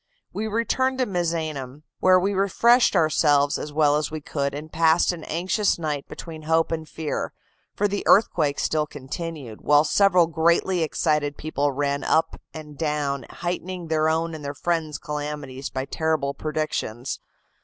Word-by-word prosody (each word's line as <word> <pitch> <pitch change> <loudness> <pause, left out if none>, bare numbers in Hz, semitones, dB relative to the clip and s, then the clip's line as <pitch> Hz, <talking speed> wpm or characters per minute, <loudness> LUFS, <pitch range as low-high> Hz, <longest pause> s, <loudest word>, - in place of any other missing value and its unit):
We 220 +1 -2
returned 260 +4 0
to 255 - +1
Misenum, 155 - -3 0.2
where 185 0 +5
we 195 +3 0
refreshed 235 +6 +4
ourselves 145 -2 +3
as 150 - -6
well 145 -1 +3
as 150 -1 -1
we 155 - -5
could, 140 -1 -3
and 155 +2 -7
passed 165 +2 +4
an 170 -3 -7
anxious 185 +6 0
night 150 -4 -3
between 160 -2 -8
hope 160 +1 +1
and 160 -1 -3
fear, 160 -2 -3 0.4
for 205 - +2
the 205 0 -2
earthquake 155 -9 +4
still 155 -1 0
continued, 145 -3 -7
while 145 0 +5
several 180 +1 +4
greatly 170 +3 +2
excited 150 -2 0
people 145 -2 -1
ran 140 0 -1
up 160 +1 +1
and 150 -2 -10
down, 150 -3 -1
heightening 175 0 -4
their 155 0 +2
own 165 +1 0
and 155 -2 -7
their 140 0 -5
friends' 160 -2 -1
calamities 145 -3 -5
by 130 0 -3
terrible 155 -2 -1
predictions. 150 -6 -3
155 Hz, 155 wpm, -24 LUFS, 145-170 Hz, 0.4 s, where